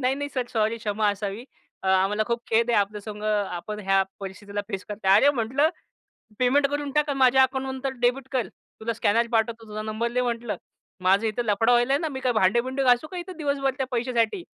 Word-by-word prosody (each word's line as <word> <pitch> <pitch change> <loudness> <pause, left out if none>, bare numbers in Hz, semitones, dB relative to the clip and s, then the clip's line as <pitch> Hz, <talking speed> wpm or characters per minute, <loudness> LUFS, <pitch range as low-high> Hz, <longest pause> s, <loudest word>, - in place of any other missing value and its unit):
नाही, 260 +1 +1
नाही 285 +1 -4
sir 255 -2 -1
sorry 220 0 +1
क्षमा 210 -1 0
असावी. 205 +3 -5 0.4
अ, - - -5
आम्हाला 195 +3 +3
खूप 235 0 -1
खेद 230 +1 +3
आहे, 230 - +3
आपल्या 205 +1 -1
संग 210 0 -8
आपण 210 -1 -2
ह्या 195 -1 +3 0.2
परिस्थितीला 200 +1 -5
फेस 195 -2 -4
करत 210 -1 -7
आहात. 190 +1 +7
अरे, 280 +7 +6
म्हटलं 265 +3 +1 0.7
पेमेंट 275 +3 +3
करून 290 0 -3
टाक 300 +1 +1
माझ्या 265 -1 +5
अकाउंटमंतर 265 0 -2
डेबिट 250 +2 +1
कर, 250 -6 0 0.3
तुला 230 +1 -2
स्कॅनर 230 +1 +2
पाठवतो. 225 0 0
तुझा 210 0 -4
नंबर 220 +2 -2
दे, 250 - +2
म्हटलं 235 -2 -2 0.5
माझं 195 +4 +3
इथं 220 +3 -2
लफडं 220 +3 +2
व्हायला 240 +2 +3
आहे 280 - +2
ना, 325 - -1
मी 265 -2 -5
काय 255 -1 +1
भांडे-बिंडे 235 +6 +2
घासू 250 +4 +3
का 365 - -6
इथं 360 0 -7
दिवसभर, 280 -3 0
त्या 265 - -1
पैशासाठी? 240 - 0
235 Hz, 205 wpm, -25 LUFS, 210-265 Hz, 0.7 s, आहात